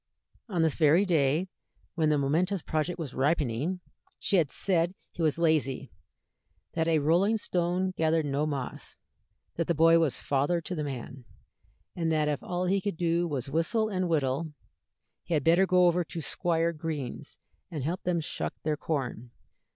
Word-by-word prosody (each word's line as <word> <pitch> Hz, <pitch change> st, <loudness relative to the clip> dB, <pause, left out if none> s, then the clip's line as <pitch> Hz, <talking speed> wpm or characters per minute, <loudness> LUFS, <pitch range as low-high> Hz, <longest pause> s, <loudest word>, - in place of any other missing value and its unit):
On 175 Hz, -5 st, +1 dB
this 160 Hz, -3 st, +3 dB
very 165 Hz, +5 st, +5 dB
day, 160 Hz, 0 st, +2 dB, 0.5 s
when 160 Hz, -3 st, +1 dB
the 150 Hz, -, +3 dB
momentous 165 Hz, +7 st, +1 dB
project 155 Hz, +3 st, -1 dB
was 150 Hz, -7 st, -5 dB
ripening, 145 Hz, +4 st, 0 dB, 0.4 s
she 200 Hz, -, +1 dB
had 160 Hz, -5 st, +2 dB
said 175 Hz, +1 st, 0 dB, 0.2 s
he -, -, -7 dB
was 155 Hz, -2 st, +2 dB
lazy, 150 Hz, -5 st, +1 dB, 0.8 s
that 160 Hz, 0 st, 0 dB
"a 165 Hz, -1 st, +3 dB
rolling 175 Hz, +9 st, +3 dB
stone 180 Hz, -1 st, 0 dB
gathered 160 Hz, -2 st, +1 dB
no 145 Hz, +2 st, 0 dB
moss," 140 Hz, -4 st, -5 dB, 0.6 s
that 170 Hz, -, 0 dB
the 170 Hz, -, +1 dB
"boy 165 Hz, +2 st, +6 dB
was 160 Hz, -5 st, +1 dB
father 145 Hz, +5 st, +1 dB
to 170 Hz, +2 st, -6 dB
the 155 Hz, -3 st, -2 dB
man," 130 Hz, -2 st, -6 dB, 0.7 s
and 165 Hz, -2 st, 0 dB
that 155 Hz, -1 st, +2 dB
if 150 Hz, -2 st, -1 dB
all 180 Hz, 0 st, -2 dB
he 195 Hz, +2 st, +1 dB
could 200 Hz, -4 st, -3 dB
do 170 Hz, 0 st, +1 dB
was 135 Hz, -6 st, -3 dB
to 135 Hz, -, -9 dB
whistle 215 Hz, -, +1 dB
and 185 Hz, -3 st, -1 dB
whittle, 150 Hz, 0 st, 0 dB, 0.7 s
he 170 Hz, -, -1 dB
had 150 Hz, -, +1 dB
better 175 Hz, +5 st, +4 dB
go 180 Hz, -1 st, +5 dB
over 175 Hz, 0 st, +3 dB
to 170 Hz, -, -7 dB
Squire 170 Hz, +1 st, 0 dB
Green's 155 Hz, -5 st, -5 dB, 0.3 s
and 150 Hz, -5 st, -4 dB
help 170 Hz, +6 st, -2 dB
them 175 Hz, -1 st, 0 dB
shuck -, -, -4 dB
their 155 Hz, -1 st, 0 dB
corn. 125 Hz, -7 st, -3 dB
165 Hz, 175 wpm, -28 LUFS, 145-175 Hz, 0.8 s, boy